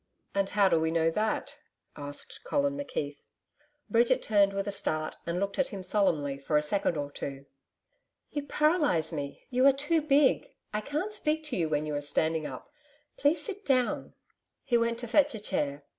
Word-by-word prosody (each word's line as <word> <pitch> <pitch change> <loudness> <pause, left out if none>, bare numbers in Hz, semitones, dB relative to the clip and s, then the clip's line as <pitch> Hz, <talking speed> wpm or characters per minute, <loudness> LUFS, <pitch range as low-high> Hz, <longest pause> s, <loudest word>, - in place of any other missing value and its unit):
"' - - -45
'And 195 0 +1
how 205 -1 +4
do 165 -3 +3
we 160 0 +1
know 165 0 +2
that?' 220 - -1 0.4
asked 145 0 -8
Colin 285 0 0
McKeith. 145 - -4 0.7
Bridget 240 +2 +3
turned 200 -2 +4
with 195 +1 -3
a - - 0
start 155 -6 -2
and 170 +1 -1
looked 200 +4 -2
at 275 - +3
him 195 -3 -7
solemnly 160 -8 +1
for 150 +2 +1
a - - +3
second 175 +1 0
or 145 -1 -3
two. 140 -1 -6 0.9
'You 290 -1 -4
paralyse 300 - +2
me: 140 -2 -5
you 255 +1 +2
are - - +9
too 295 +4 +1
big. 285 -2 +3 0.3
I 210 - 0
can't 305 - -3
speak 315 -6 0
to 300 -5 -3
you 165 -4 0
when 150 0 0
you 150 - -3
are 145 - -1
standing 160 +1 0
up. 130 - -9 0.4
Please 295 +2 +2
sit 405 -1 -6
down.' 255 -5 0 0.5
He 245 - +1
went 230 0 +2
to 240 - -5
fetch 285 +2 +3
a - - -4
chair. 145 -8 -2
200 Hz, 190 wpm, -29 LUFS, -, 0.9 s, are